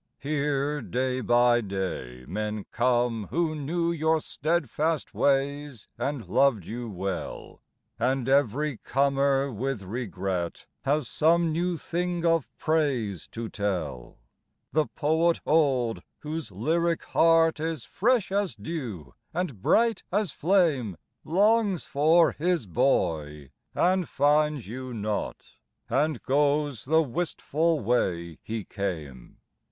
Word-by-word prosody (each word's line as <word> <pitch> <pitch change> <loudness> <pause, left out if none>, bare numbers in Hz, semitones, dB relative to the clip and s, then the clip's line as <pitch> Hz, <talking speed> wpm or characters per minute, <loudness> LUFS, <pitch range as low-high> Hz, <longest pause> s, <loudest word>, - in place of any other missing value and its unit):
Here 145 0 -1
day 130 +4 -1
by 120 0 +4
day 95 - -4
men 105 +2 -3
come 120 -3 +1
who 165 -1 0
knew 165 +3 -1
Your 160 -1 +2
steadfast 155 0 -1
ways 140 -3 0
and 140 -4 -3
loved 130 -10 +3
you 120 +3 -5
well; 95 -2 -5 0.4
And 130 +1 0
every 140 +1 +2
comer 140 +1 +1
with 125 -1 -3
regret 95 -5 -3 0.2
Has 145 0 +1
some 165 +1 +3
new 175 +2 0
thing 175 +1 -2
of 165 -3 +2
praise 135 - 0
to 115 0 -6
tell. 85 - -3 0.5
The 155 -1 +2
poet 160 +3 +1
old, 135 -7 +2 0.2
whose 155 -4 -5
lyric 165 - 0
heart 165 -1 +4
Is 160 -4 -3
fresh 235 -2 +1
as 200 -1 0
dew 120 - -6 0.2
and 165 - -3
bright 230 - +3
as 200 -3 +1
flame, 150 - +1 0.3
Longs 205 +1 +2
for 160 +4 +4
"his 170 -4 0
boy," 80 - 0 0.2
and 185 0 +2
finds 150 -2 +2
you 125 +2 -6
not, 105 -1 -3 0.5
And 150 +3 +1
goes 145 -1 +1
the 160 +4 +4
wistful 160 +2 -1
way 90 -8 0
he 110 -1 -4
came. 80 - -5
140 Hz, 115 wpm, -27 LUFS, 110-160 Hz, 0.5 s, by